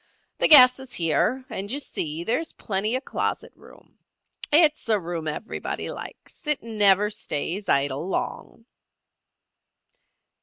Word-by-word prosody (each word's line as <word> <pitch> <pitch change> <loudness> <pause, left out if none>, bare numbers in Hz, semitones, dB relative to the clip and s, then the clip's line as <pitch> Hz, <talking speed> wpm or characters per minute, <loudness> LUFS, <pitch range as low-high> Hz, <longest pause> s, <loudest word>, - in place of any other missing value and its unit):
The - - +4
gas 255 -4 +8
is 265 -2 -7
here, 215 +10 0
and 200 +2 -6
you 280 - -2
see 160 - -3
there 225 +7 0
is 325 - -5
plenty 210 +3 -2
of 260 - -4
closet - - -3
room. - - -19 0.5
It's 305 -5 +3
a 215 -2 +3
room 170 -2 -5
everybody 155 +9 -5
likes. 335 - -11
It 300 -2 0
never 210 -2 +3
stays 195 0 -3
idle 140 +3 0
long." 225 +3 -5
210 Hz, 130 wpm, -24 LUFS, 170-255 Hz, 0.5 s, gas